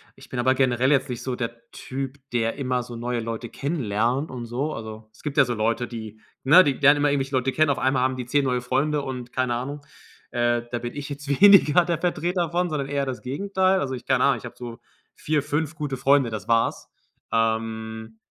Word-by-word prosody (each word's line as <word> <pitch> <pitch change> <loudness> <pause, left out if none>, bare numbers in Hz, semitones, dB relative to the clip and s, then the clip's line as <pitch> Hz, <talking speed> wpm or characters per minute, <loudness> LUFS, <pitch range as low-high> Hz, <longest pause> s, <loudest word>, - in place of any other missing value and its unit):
Ich 135 0 -16
bin 125 - -4
aber 130 +2 +3
generell 130 0 +2
jetzt 140 -1 +2
nicht 120 -2 -5
so 130 -1 -2
der 115 -1 -6
Typ, 135 +1 -6 0.2
der 115 -1 0
immer 125 -3 -1
so 120 0 -9
neue 120 +1 -2
Leute 115 +1 -5
kennenlernt 130 -1 -1
und 125 -2 -6
so. 130 +6 -3
Also, 110 0 -8
es - - -20
gibt 150 -2 -4
ja 140 - +7
so 120 - -2
Leute, 115 +2 0
die 110 -2 -8 0.2
ne, 175 +8 +8
die 145 - +1
lernen 145 +2 +5
immer 145 0 +2
irgendwelche 135 -1 -1
Leute 130 +1 +1
kennen. 155 +2 +2
Auf 140 - 0
einmal 130 -1 +1
haben 130 0 +1
die 125 - -4
10 140 +3 +1
neue 125 -1 0
Freunde 145 +4 0
und 125 -3 -6
keine 125 -2 0
Ahnung. 140 +4 -5 0.5
Äh, 120 -1 +1
da 120 - -2
bin 120 0 -6
ich 145 0 -6
jetzt 145 0 -7
weniger 185 -5 +7
der 170 -1 0
Vertreter 175 0 -1
von, 175 +1 0
sondern 145 -3 -2
eher 140 0 -1
das 130 -2 -5
Gegenteil. 190 +7 +1
Also, 135 -5 -2
ich 125 - -7
keine 130 -1 +2
Ahnung, 140 -2 +3
ich 120 - -10
habe 120 - -9
so 120 -2 -8 0.4
4, 150 -2 -1
5 155 +2 -2
gute 145 -3 -3
Freunde, 135 -1 +3
das 110 -2 -6
war's. 115 0 +1 0.4
Ähm, 110 0 -2
130 Hz, 225 wpm, -24 LUFS, 120-145 Hz, 0.5 s, ne